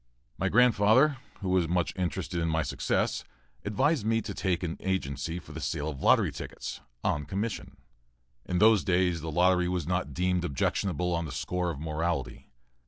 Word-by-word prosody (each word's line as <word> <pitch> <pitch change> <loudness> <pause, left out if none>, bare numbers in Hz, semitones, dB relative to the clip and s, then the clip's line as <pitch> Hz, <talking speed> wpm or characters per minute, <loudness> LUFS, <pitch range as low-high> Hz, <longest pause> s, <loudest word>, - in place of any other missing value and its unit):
My - - +1
grandfather, 125 +4 +5 0.2
who 95 - -2
was 90 -2 +2
much 85 +1 0
interested 90 0 -2
in 85 - 0
my 80 0 +1
success, 70 - -1 0.4
advised 130 +6 +1
me 115 +1 +2
to - - -5
take 90 -2 -1
an 85 -2 -3
agency 80 -4 -2
for 90 - -10
the - - -7
sale 80 -1 -2
of 70 -4 -7
lottery - - +4
tickets, - - -7 0.2
on 75 0 0
commission. 100 +6 -4 0.7
In 90 - 0
those 110 0 +5
days, 90 -3 +1
the 80 - -4
lottery 90 +2 +3
was 90 -3 -1
not 90 +1 -2
deemed 90 0 +1
objectionable 90 +3 0
on 85 0 -1
the 75 - -6
score 90 +4 -2
of 75 -5 -4
morality. 80 -4 -3
90 Hz, 170 wpm, -29 LUFS, 80-95 Hz, 0.7 s, grandfather